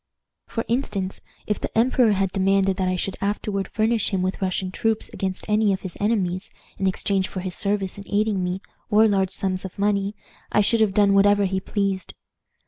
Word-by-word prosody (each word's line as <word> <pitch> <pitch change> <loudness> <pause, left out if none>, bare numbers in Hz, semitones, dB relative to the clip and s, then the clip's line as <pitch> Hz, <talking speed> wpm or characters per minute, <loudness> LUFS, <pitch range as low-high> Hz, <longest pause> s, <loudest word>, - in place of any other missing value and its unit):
"For 230 - -3
instance, 205 -6 -2 0.2
if 210 - -1
the - - -4
emperor 235 -1 +4
had 195 -1 0
demanded 195 0 +2
that 185 - 0
I 185 - +1
should 185 +1 -3
afterward 200 -1 -1
furnish 220 0 +1
him 190 -3 0
with 185 +2 -2
Russian 185 0 -1
troops 225 +2 -1
against 190 -2 -3
any 210 -1 +3
of 190 - -3
his 185 -3 -5
enemies, 195 -3 0 0.3
in 195 - +1
exchange 190 0 0
for 185 - -5
his 185 -1 -4
service 200 -1 -1
in 200 - -9
aiding 205 -2 +1
me, 180 +1 -2 0.3
or 215 +1 +5
large 195 -2 +2
sums 190 -1 -1
of 190 - -8
money, 200 0 0 0.4
I 210 - +4
should 225 +2 +2
have 205 -3 +2
done 205 -1 +5
whatever 205 +1 +5
he 190 0 0
pleased. 195 -1 -2
195 Hz, 195 wpm, -23 LUFS, 190-210 Hz, 0.4 s, or